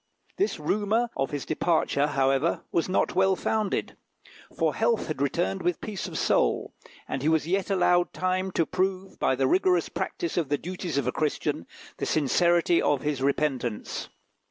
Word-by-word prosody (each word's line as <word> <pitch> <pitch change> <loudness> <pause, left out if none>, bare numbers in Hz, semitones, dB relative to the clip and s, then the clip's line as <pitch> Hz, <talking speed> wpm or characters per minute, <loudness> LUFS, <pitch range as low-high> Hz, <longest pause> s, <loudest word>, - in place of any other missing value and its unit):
This 400 - 0
rumour 215 +4 0
of 135 - -1
his 145 -2 -4
departure, 155 -3 +1
however, 135 +2 +1
was 170 - 0
not 185 - +1
well 190 0 +3
founded, 215 +1 -1 0.6
for 160 -3 +2
health 225 0 +1
had 155 -3 -4
returned 95 -8 0
with 175 0 0
peace 210 -4 -5
of - - -6
soul, - - +1 0.3
and 135 - -3
he 150 - +2
was 160 -2 +2
yet 190 +3 0
allowed 175 -2 +3
time 185 +1 -1
to 165 - +2
prove, 190 +2 -2
by 130 - +2
the 135 +1 +1
rigorous 180 +3 +2
practice 170 0 -3
of 165 -5 0
the 145 - +2
duties 175 -1 -4
of 140 - +1
a 125 - +1
Christian, 150 +1 -2 0.3
the - - -3
sincerity 170 +3 +3
of 145 -3 +1
his 145 -3 -1
repentance. 135 -5 -1
170 Hz, 170 wpm, -27 LUFS, 140-185 Hz, 0.6 s, well